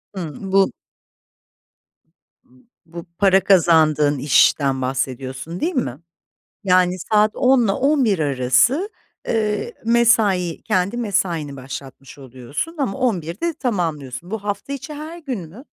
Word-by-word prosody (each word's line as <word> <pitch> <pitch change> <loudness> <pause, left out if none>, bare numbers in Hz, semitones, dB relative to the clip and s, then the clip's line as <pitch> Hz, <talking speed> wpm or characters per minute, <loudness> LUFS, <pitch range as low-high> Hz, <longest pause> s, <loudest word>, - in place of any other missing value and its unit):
Hımm. 185 +2 -6
Bu 195 0 +3 2.1
Bu 170 0 -9
para 195 -1 +4
kazandığın 155 -6 +4
işten, 135 0 +3
bahsediyorsun 130 +4 -4
değil 345 +3 -1
mi? 140 - -2 0.7
Yani 185 -1 +3
saat 210 +3 +2
10.00'la 245 -6 +3
11.00 265 - +2
arası, 145 - +2 0.4
eee, 220 - -1
mesai, 220 -7 +2
kendi 185 +5 0
mesaini 180 -10 -1
başlatmış 135 +1 -10
oluyorsun, 130 - -6
ama 270 -3 -2
11.00'de 225 - -1
tamamlıyorsun. 170 - -3
Bu 220 -2 -5
hafta 205 +6 -4
içi 280 +2 -6
her 315 +3 -8
gün 265 - -5
mü? 225 - -13
185 Hz, 110 wpm, -20 LUFS, 145-235 Hz, 2.1 s, para